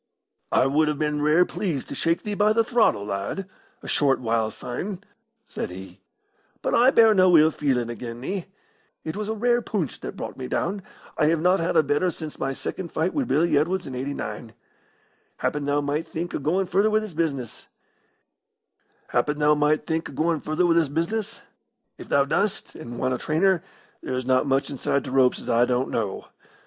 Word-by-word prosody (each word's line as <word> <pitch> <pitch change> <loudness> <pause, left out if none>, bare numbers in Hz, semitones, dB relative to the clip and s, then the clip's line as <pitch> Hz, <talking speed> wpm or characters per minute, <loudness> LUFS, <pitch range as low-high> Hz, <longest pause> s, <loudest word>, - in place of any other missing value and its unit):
"I - - +4
would 150 +3 +2
have 150 -1 -1
been 150 -1 -1
rare 155 +4 +4
pleased 170 -11 -3
to - - -5
shake 165 +1 0
thee 210 - -3
by 210 +1 +3
the 230 +1 +3
throttle, 225 - +2
lad, 100 - -3 0.4
a - - -8
short 140 -2 +2
while 115 -2 0
syne," 185 - -5 0.4
said - - -5
he. 95 +1 -10 0.6
"But - - 0
I 245 +2 +6
bear 225 -4 +6
no 185 -3 +6
ill 155 +1 +5
feeling 130 -6 0
again' 120 0 -6
thee. 180 +8 -4 0.6
It 155 - -4
was 210 0 -4
a 220 - -1
rare 240 +2 +2
poonch 200 - -3
that - - -7
brought - - -6
me 130 -1 -5
down 195 +9 -2 0.4
I 150 - +4
have 165 0 +2
not 180 +4 +3
had 165 0 0
a 160 - +6
better 145 +5 +1
since 155 -2 -7
my 135 - -1
second 170 +6 -5
fight 165 +4 0
wi' 280 - 0
Billy 160 - +2
Edwards 175 +6 +1
in 130 - -7
'89. 120 -4 -5 0.8
Happen 145 -1 -2
thou 145 +1 +1
might 145 +3 -2
think 170 +2 -5
o' - - -1
goin' 170 +7 +1
further 195 +4 +2
wi' 215 - +3
this 215 -4 -3
business. 145 -7 -3 1.5
If - - +4 2.9
thou 140 -1 +3
dost, 195 +8 -1
and 120 -6 -8
want 130 - 0
a - - -1
trainer, 175 +3 +2 0.4
there's 130 0 -3
not 130 +2 +2
much 135 0 +1
inside 140 0 -1
t' 130 - -6
ropes 130 -1 +3
as - - -10
I 120 +1 +4
don't 125 +1 0
know. 105 -4 -2
150 Hz, 175 wpm, -24 LUFS, 130-185 Hz, 2.9 s, I